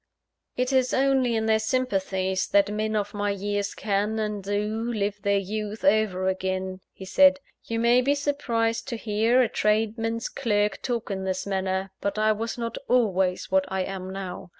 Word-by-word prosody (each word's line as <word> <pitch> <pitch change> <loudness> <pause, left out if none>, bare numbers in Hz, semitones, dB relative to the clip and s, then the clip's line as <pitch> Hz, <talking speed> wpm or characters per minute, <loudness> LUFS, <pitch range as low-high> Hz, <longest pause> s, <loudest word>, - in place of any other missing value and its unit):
"It 255 +2 0
is 255 -1 +2
only 265 -3 +2
in 220 0 0
their 220 0 +3
sympathies, 195 -6 0
that 200 0 +3
men 215 +1 -1
of 205 -1 -1
my 205 0 -1
years 205 0 -2
can, 210 +1 -1
and 210 -2 -2
do, 210 +4 -2
live 205 -2 -2
their 200 +1 +2
youth 210 +4 -4
over 215 -8 +2
again," 190 0 -2
he 190 - -10
said. 280 +8 +5 0.3
"You 230 0 -2
may 240 +2 +4
be 280 +3 +2
surprised 250 -6 -1
to 245 - -3
hear 225 +4 +2
a - - +1
tradesman's 225 +2 0
clerk 210 -5 0
talk 235 -4 -3
in 190 -1 -3
this 185 0 -2
manner; 190 -1 -2
but 200 +1 -2
I 215 0 +3
was 225 +2 -3
not 230 -1 -4
always 190 -8 +1
what 190 0 +3
I 190 -1 0
am 190 0 -5
now. 190 -2 -6
210 Hz, 175 wpm, -26 LUFS, 195-230 Hz, 0.3 s, said